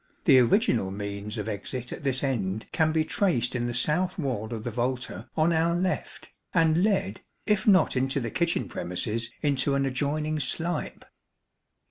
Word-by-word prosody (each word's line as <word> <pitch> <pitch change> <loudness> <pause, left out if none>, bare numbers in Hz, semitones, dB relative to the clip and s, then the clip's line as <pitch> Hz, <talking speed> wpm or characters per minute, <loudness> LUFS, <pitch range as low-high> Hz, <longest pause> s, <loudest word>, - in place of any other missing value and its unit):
The 135 -6 +7
original 120 - +3
means 100 +2 -5
of 105 - -3
exit 120 +4 -5
at - - -8
this 135 -1 -1
end 110 -6 -1
can 160 -1 +2
be 155 0 +1
traced 135 - +1
in 120 0 -1
the 120 - -3
south 180 +9 +1
wall 125 - -2
of 110 -2 -4
the 120 - -3
volta 125 -3 -3
on 160 +2 +3
our 165 +1 +2
left, 185 +1 -3 0.2
and 165 +1 +4
led, 195 - 0 0.2
if 210 -1 +1
not 190 -8 +5
into 135 +2 0
the 115 -4 -4
kitchen 170 -1 0
premises, 110 +6 -3
into 140 -1 +1
an 140 0 +1
adjoining 150 +4 -1
slype. 165 +4 -3
135 Hz, 165 wpm, -27 LUFS, 115-160 Hz, 0.2 s, The